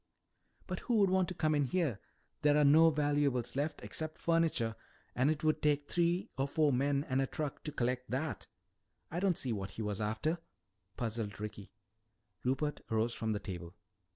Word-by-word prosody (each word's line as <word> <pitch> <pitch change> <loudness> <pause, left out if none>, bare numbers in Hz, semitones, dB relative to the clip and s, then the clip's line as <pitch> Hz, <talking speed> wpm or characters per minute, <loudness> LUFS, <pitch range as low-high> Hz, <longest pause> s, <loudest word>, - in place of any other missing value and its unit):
"But - - -4
who 240 - 0
would 200 -3 +4
want 185 -1 +3
to 180 - -5
come 155 -2 +1
in 145 -2 +2
here? 145 - 0 0.4
There 150 0 +4
are 150 - +5
no 160 +3 +7
valuables 145 -5 +1
left 145 +3 -2
except 155 0 -3
furniture. 165 -10 +1 0.4
And 130 +3 +2
it 155 0 -1
would 155 0 +2
take 145 -1 +2
three 175 +1 +1
or 135 - +2
four 150 0 +2
men 140 +2 +2
and 130 +1 +1
a 135 - 0
truck 150 0 -4
to 150 - -2
collect 125 -1 -1
that. 140 +4 -3 0.6
I 170 - -1
don't 185 -3 +2
see 125 -3 0
what 100 -2 -4
he 110 +3 -5
was 105 0 -2
after," 110 +11 -1 0.6
puzzled 110 -4 -3
Ricky. 105 -1 -7 0.7
Rupert 135 +4 0
arose 115 +1 +1
from 110 -1 -1
the 105 - -2
table. 90 -3 -7
140 Hz, 180 wpm, -34 LUFS, 115-155 Hz, 0.7 s, no